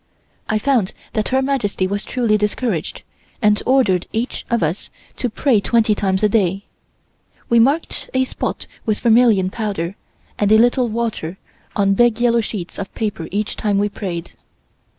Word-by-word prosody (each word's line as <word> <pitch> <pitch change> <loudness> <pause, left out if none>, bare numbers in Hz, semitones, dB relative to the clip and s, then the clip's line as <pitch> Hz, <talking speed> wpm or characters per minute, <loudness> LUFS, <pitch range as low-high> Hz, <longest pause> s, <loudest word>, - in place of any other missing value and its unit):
I 215 - +2
found 225 -4 +1 0.2
that 215 -1 0
Her 265 +1 +1
Majesty 245 -9 0
was 200 +2 -2
truly 235 -4 +1
discouraged, 210 -3 -2 0.4
and 210 -3 +3
ordered 240 -9 +3
each 230 +3 -3
of 235 -4 +1
us 160 +5 -2 0.3
to 245 - -1
pray 230 -1 +2
twenty 225 0 +3
times 195 -1 0
a - - +6
day. 195 -2 +1 0.8
We 235 - +5
marked 280 +8 +1
a 260 0 +2
spot 260 - -4 0.2
with 215 -2 0
vermilion 225 -5 +4
powder 200 -5 -3 0.4
and 205 0 +2
a 220 - +7
little 245 +1 +3
water 215 -6 -3 0.4
on 195 -1 +3
big 240 +2 +3
yellow 235 -1 +3
sheets 205 -5 -6
of 195 - -5
paper 210 -7 -3
each 210 +2 -2
time 205 -2 0
we 205 +1 +1
prayed. 180 -4 -5
215 Hz, 160 wpm, -19 LUFS, 195-235 Hz, 0.8 s, a